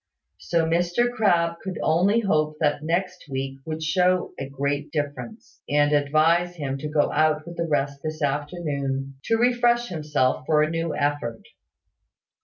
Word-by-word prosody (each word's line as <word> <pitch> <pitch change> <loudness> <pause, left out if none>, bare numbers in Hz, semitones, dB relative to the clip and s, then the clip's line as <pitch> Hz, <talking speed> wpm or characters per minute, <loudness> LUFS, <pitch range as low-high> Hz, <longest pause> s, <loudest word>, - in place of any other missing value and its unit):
So 165 -1 0
Mr 175 +8 +1
Crabbe 170 -7 +2
could 190 -2 -4
only 190 +8 +3
hope 155 -6 +1
that 145 -2 +1
next 175 +1 -2
week 135 0 -4
would 160 0 -4
show 180 +3 +1
a 135 - -5
great 140 +2 -2
difference, 150 +9 -5
and 145 0 +3
advise 155 +5 +2
him 140 -4 -3
to 150 - -4
go 150 -1 +2
out 155 0 +2
with 170 0 -8
the 170 0 -2
rest 140 -2 -1
this 155 0 -4
afternoon, 140 -2 -2
to 225 - +2
refresh 240 0 +2
himself 150 -6 0
for 150 -1 +4
a 155 - -1
new 165 -1 -2
effort. 145 -6 -2
155 Hz, 155 wpm, -24 LUFS, 145-175 Hz, -, for